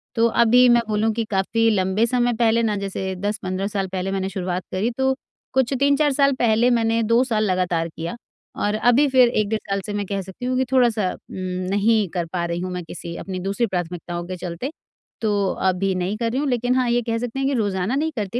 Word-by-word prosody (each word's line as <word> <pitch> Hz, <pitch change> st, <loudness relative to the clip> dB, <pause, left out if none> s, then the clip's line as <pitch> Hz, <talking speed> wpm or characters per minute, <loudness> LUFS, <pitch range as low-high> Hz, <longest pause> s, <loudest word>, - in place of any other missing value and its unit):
तो 230 Hz, 0 st, +4 dB, 0.2 s
अभी 245 Hz, +2 st, +6 dB
मैं 240 Hz, 0 st, +5 dB
बोलूँ 215 Hz, +1 st, +1 dB
कि 230 Hz, +1 st, -1 dB
काफ़ी 225 Hz, +4 st, +2 dB
लंबे 195 Hz, +1 st, +2 dB
समय 245 Hz, 0 st, +1 dB
पहले 230 Hz, 0 st, +3 dB
ना 215 Hz, -2 st, +1 dB
जैसे 195 Hz, -1 st, -3 dB
10-15 190 Hz, 0 st, -2 dB
साल 200 Hz, -2 st, -2 dB
पहले 190 Hz, 0 st, -2 dB
मैंने 190 Hz, 0 st, -1 dB
शुरुआत 185 Hz, -1 st, -3 dB
करी 195 Hz, +5 st, 0 dB
तो 265 Hz, 0 st, +2 dB, 0.4 s
कुछ 265 Hz, 0 st, +2 dB
3-4 285 Hz, +1 st, +3 dB
साल 275 Hz, 0 st, +3 dB
पहले 230 Hz, +1 st, +4 dB
मैंने 230 Hz, -1 st, +2 dB
2 230 Hz, +3 st, +3 dB
साल 225 Hz, -4 st, 0 dB
लगातार 180 Hz, -3 st, 0 dB
किया 165 Hz, +3 st, -6 dB, 0.5 s
और 210 Hz, +1 st, +1 dB
अभी 245 Hz, +6 st, +4 dB
फिर 255 Hz, -2 st, +5 dB
1 215 Hz, -3 st, 0 dB
डेढ़ 220 Hz, 0 st, 0 dB
साल 195 Hz, 0 st, 0 dB
से 210 Hz, -, -4 dB
मैं 205 Hz, 0 st, -2 dB
कह 195 Hz, 0 st, -3 dB
सकती 190 Hz, +6 st, -8 dB
हूँ 255 Hz, 0 st, 0 dB
कि 260 Hz, -, +2 dB
थोड़ा-सा 235 Hz, -7 st, +3 dB
उम, -, -, -12 dB, 0.3 s
नहीं 205 Hz, +1 st, +2 dB
कर 175 Hz, -2 st, -1 dB
पा 175 Hz, -1 st, -1 dB
रही 170 Hz, 0 st, -2 dB
हूँ 185 Hz, 0 st, -4 dB
मैं 180 Hz, 0 st, -4 dB
किसी 170 Hz, +1 st, -8 dB
अपनी 185 Hz, -1 st, -5 dB
दूसरी 195 Hz, +6 st, -1 dB
प्राथमिकताओं 175 Hz, -2 st, -4 dB
के 185 Hz, 0 st, -5 dB
चलते 180 Hz, -, -5 dB, 0.5 s
तो 220 Hz, -2 st, +1 dB, 0.4 s
अभी 190 Hz, +1 st, 0 dB
नहीं 185 Hz, +3 st, -2 dB
कर 230 Hz, 0 st, -1 dB
रही 260 Hz, -, -1 dB
हूँ, 290 Hz, -, -1 dB
लेकिन 245 Hz, 0 st, +1 dB
हाँ, 255 Hz, -2 st, +2 dB
ये 240 Hz, +1 st, +2 dB
कह 230 Hz, -1 st, -2 dB
सकते 245 Hz, +2 st, -4 dB
हैं 270 Hz, -, +1 dB
कि 280 Hz, -, 0 dB
रोज़ाना 205 Hz, -1 st, 0 dB
नहीं 315 Hz, +3 st, 0 dB
करती 215 Hz, +1 st, -2 dB
215 Hz, 225 wpm, -22 LUFS, 190-240 Hz, 0.5 s, अभी